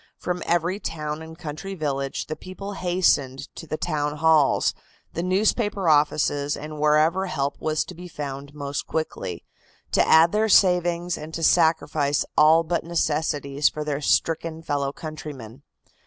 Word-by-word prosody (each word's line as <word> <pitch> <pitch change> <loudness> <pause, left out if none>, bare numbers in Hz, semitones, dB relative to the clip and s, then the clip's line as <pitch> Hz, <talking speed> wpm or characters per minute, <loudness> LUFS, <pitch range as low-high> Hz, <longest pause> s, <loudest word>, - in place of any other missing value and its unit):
From 180 0 -3
every 175 +3 +1
town 155 -4 -4
and 160 0 -10
country 175 +4 -6
village 140 -4 -2
the 155 - -5
people 195 +4 -8
hastened 175 -8 0
to 165 - -9
the 155 - -3
Town 150 -3 -2
Halls, 155 -2 +3 0.4
the 170 - -2
newspaper 200 +1 +1
offices 145 -1 +2
and 150 +1 -7
wherever 155 +5 +3
help 140 -5 -2
was 155 -1 -1
to - - -9
be 180 +2 -10
found 145 -2 -7
most 140 -1 -4
quickly, 95 - -4 0.5
to - - +4
add 165 +1 +6
their 220 +1 +1
savings 175 -2 +3
and 155 +1 -8
to 165 - -4
sacrifice 160 -3 +2
all 160 +2 +6
but 170 +1 -1
necessities 150 -3 0
for 150 - -5
their 150 -1 -3
stricken 165 +2 0
fellow 140 -3 -1
countrymen. 145 -6 -8
155 Hz, 150 wpm, -24 LUFS, 145-175 Hz, 0.5 s, add